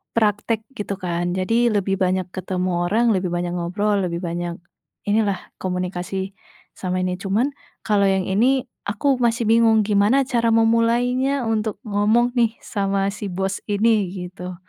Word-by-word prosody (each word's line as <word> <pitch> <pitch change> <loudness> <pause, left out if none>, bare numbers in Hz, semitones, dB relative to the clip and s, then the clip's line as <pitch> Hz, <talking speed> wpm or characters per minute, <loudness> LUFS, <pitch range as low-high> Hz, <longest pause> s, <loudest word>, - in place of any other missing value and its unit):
praktek 220 0 +1
gitu, 205 -5 -4
kan. 175 -1 -2
Jadi, 230 +6 +2
lebih 195 -1 0
banyak 185 -1 +1
ketemu 185 0 -2 0.2
orang, 230 +4 +3
lebih 185 -2 0
banyak 175 0 -2
ngobrol, 200 +4 0
lebih 170 +1 -4
banyak 170 0 -3 0.5
inilah, 205 -2 +1 0.2
komunikasi 180 +1 -3 0.4
sama 185 0 -2
ini. 180 0 -2
Cuman, 215 +9 0 0.3
kalau 205 -2 +3
yang 190 -1 +2
ini, 240 +8 +2 0.2
aku 260 +5 +1
masih 235 -1 +1
bingung 225 -1 +4
gimana 210 +6 +3
cara 240 -3 0
memulainya 235 +4 +2
untuk 215 -2 -2
ngomong 220 +3 +2
nih 235 -2 +1
sama 195 -1 -1
si 205 0 -6
bos 190 +1 -2
ini, 210 0 +2
gitu. 180 0 -7
205 Hz, 145 wpm, -22 LUFS, 185-230 Hz, 0.5 s, bingung